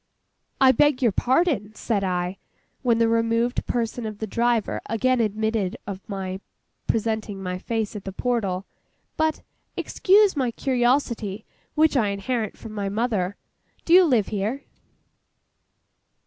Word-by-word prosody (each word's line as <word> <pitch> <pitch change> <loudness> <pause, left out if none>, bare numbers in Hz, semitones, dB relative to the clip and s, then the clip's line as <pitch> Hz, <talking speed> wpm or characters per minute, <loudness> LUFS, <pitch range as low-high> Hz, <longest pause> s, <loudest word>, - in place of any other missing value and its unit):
'I 265 -1 +7
beg 280 +1 +3
your 235 - +4
pardon,' 245 - +1
said 210 -4 -1
I, 180 0 -2 0.4
when 240 -3 +2
the 230 0 +3
removed 230 +1 +1
person 235 -1 -2
of 215 -1 -6
the 220 - -3
driver 235 +1 0
again 255 +3 +2
admitted 220 -2 -1
of 195 -1 -6
my 190 -2 -4 0.5
presenting 220 -3 -1
my 180 0 -3
face 220 +1 -2
at 205 - -6
the 195 - -4
portal. 200 -4 -1 0.5
'But—excuse 375 +5 +1
my 260 -4 +1
curiosity, 240 -5 0 0.3
which 310 0 +4
I 230 -6 +3
inherit 215 +3 -2
from 225 - -9
my 200 -2 -2
mother—do 210 - -3
you 365 0 +8
live 240 - +2
here? 215 +7 -2
225 Hz, 130 wpm, -24 LUFS, 200-250 Hz, 0.5 s, you